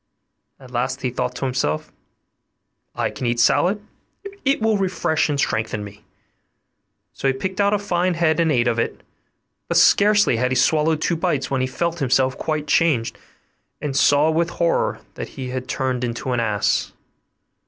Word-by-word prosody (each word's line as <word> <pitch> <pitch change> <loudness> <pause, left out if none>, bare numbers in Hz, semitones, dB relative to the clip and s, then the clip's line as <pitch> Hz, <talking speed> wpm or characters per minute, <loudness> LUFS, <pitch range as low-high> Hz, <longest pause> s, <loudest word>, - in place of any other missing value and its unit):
At 130 -2 -14
last 130 +2 -2
he 125 - 0
thought 125 +1 -3
to 135 - -3
himself, 125 - -2 1.0
'I - - -1
can 125 - -4
eat 120 0 0
salad, 195 - +2 0.6
it 275 0 +2
will 220 -1 +2
refresh 180 -5 0
and 145 -1 -1
strengthen 110 -4 -1
me.' 105 +1 -12 1.1
So - - -2
he 135 - +1
picked 190 +8 -2
out 200 +1 +3
a - - +2
fine 185 -3 0
head 160 -2 +1
and 165 -2 +2
ate 120 -3 +2
of 115 -1 +1
it; - - -2 0.7
but - - +1
scarcely 205 - +5
had 125 +2 +1
he 130 - -1
swallowed 155 +4 +2
two 170 - +1
bites 140 -4 -1
when 135 -1 0
he 130 - 0
felt 170 +5 -2
himself 130 -1 +2
quite 155 -2 -2
changed, 150 -9 +1 0.6
and 145 -2 -4
saw 145 +3 +4
with 165 +1 +1
horror 170 -1 0
that - - -7
he 130 -2 -5
was 130 -1 -4
turned 130 -2 -2
into 120 +2 -3
an 125 - 0
ass. 105 -3 0
135 Hz, 175 wpm, -21 LUFS, 125-170 Hz, 1.1 s, scarcely